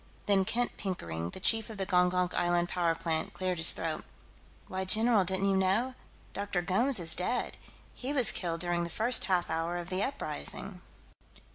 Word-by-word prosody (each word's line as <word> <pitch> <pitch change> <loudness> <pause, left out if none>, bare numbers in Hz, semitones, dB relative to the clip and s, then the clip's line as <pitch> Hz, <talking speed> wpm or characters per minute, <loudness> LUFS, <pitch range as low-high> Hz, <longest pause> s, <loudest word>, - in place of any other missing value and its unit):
Then 195 -2 +2
Kent 245 +4 -1
Pickering, 85 - -5
the - - -9
chief 225 +3 +4
of 220 - -9
the 195 - -3
Gongonk 180 -1 +1
Island 175 0 0
power 170 -2 0
plant, 165 -1 -3
cleared 185 -2 -2
his 165 - +10
throat. 160 -1 -3 0.6
"Why, 190 0 -4
general, 215 +1 +4
didn't 190 +2 -1
you - - +1
know? 195 +7 +1 0.4
Dr. 200 -3 -3
Gomes 230 +7 +2
is 165 -2 +4
dead. 185 +9 -2 0.4
He 265 +2 -5
was 260 -6 +3
killed 165 -2 -3
during 175 -1 0
the 170 - -5
first 225 +8 +3
half 180 -4 0
hour 165 +2 -2
of 175 0 -7
the 185 +1 -2
uprising." 275 +6 -4
185 Hz, 175 wpm, -29 LUFS, 175-205 Hz, 0.6 s, his